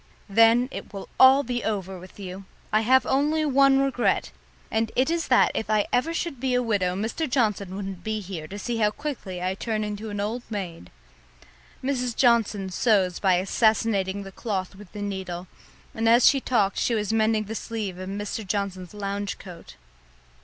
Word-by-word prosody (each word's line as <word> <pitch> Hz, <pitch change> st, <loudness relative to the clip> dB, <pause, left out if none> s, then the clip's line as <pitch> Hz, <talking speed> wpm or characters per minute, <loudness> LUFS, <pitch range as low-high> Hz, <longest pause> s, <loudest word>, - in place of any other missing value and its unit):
Then 230 Hz, +4 st, +5 dB
it -, -, -8 dB
will 195 Hz, -1 st, -6 dB
be -, -, -14 dB
all 265 Hz, +2 st, +7 dB, 0.3 s
over 190 Hz, -1 st, -7 dB
with 185 Hz, +3 st, -14 dB
you. 190 Hz, 0 st, -7 dB, 0.3 s
I 215 Hz, -, +4 dB
have 260 Hz, +4 st, +4 dB
only 300 Hz, +3 st, +1 dB
one 275 Hz, -1 st, +5 dB
regret; 270 Hz, -3 st, +1 dB, 0.4 s
and 220 Hz, 0 st, 0 dB
it 260 Hz, +5 st, +2 dB
is 335 Hz, -1 st, -1 dB
that 255 Hz, -, +4 dB
if 220 Hz, -, -3 dB
I 215 Hz, -1 st, +2 dB
ever 280 Hz, +7 st, +2 dB
should 335 Hz, -5 st, -3 dB
be 255 Hz, 0 st, 0 dB
a 250 Hz, -, +2 dB
widow 195 Hz, -6 st, 0 dB
Mr. 230 Hz, -, -2 dB
Johnson 210 Hz, -7 st, 0 dB
wouldn't 195 Hz, -3 st, -6 dB
be 220 Hz, 0 st, -2 dB
here 180 Hz, -6 st, -7 dB
to 200 Hz, -, -8 dB
see 235 Hz, +2 st, -3 dB
how 210 Hz, -2 st, +3 dB
quickly 210 Hz, -8 st, -6 dB
I 185 Hz, +1 st, 0 dB
turned 215 Hz, +2 st, -2 dB
into 210 Hz, +1 st, -5 dB
an 205 Hz, -1 st, -4 dB
old 220 Hz, +4 st, -2 dB
maid." 180 Hz, -, -6 dB, 0.9 s
Mrs. 250 Hz, -3 st, -1 dB
Johnson 220 Hz, -6 st, +2 dB
sews 190 Hz, -3 st, +2 dB
by 190 Hz, -2 st, +3 dB
assassinating 200 Hz, 0 st, +1 dB
the 195 Hz, -, -9 dB
cloth 195 Hz, -3 st, -3 dB
with 195 Hz, -2 st, -14 dB
the 205 Hz, -1 st, -6 dB
needle, 185 Hz, -3 st, -4 dB, 0.5 s
and 225 Hz, 0 st, +1 dB
as 235 Hz, +1 st, +6 dB
she 275 Hz, -, +5 dB
talked 210 Hz, -7 st, +1 dB
she 235 Hz, -, +1 dB
was 210 Hz, 0 st, -1 dB
mending 220 Hz, -1 st, +2 dB
the 215 Hz, +1 st, -6 dB
sleeve 215 Hz, -5 st, -4 dB
of 185 Hz, 0 st, -6 dB
Mr. 205 Hz, +2 st, -4 dB
Johnson's 190 Hz, -2 st, -3 dB
lounge 200 Hz, 0 st, -3 dB
coat. 175 Hz, -3 st, -12 dB
210 Hz, 185 wpm, -25 LUFS, 195-240 Hz, 0.9 s, all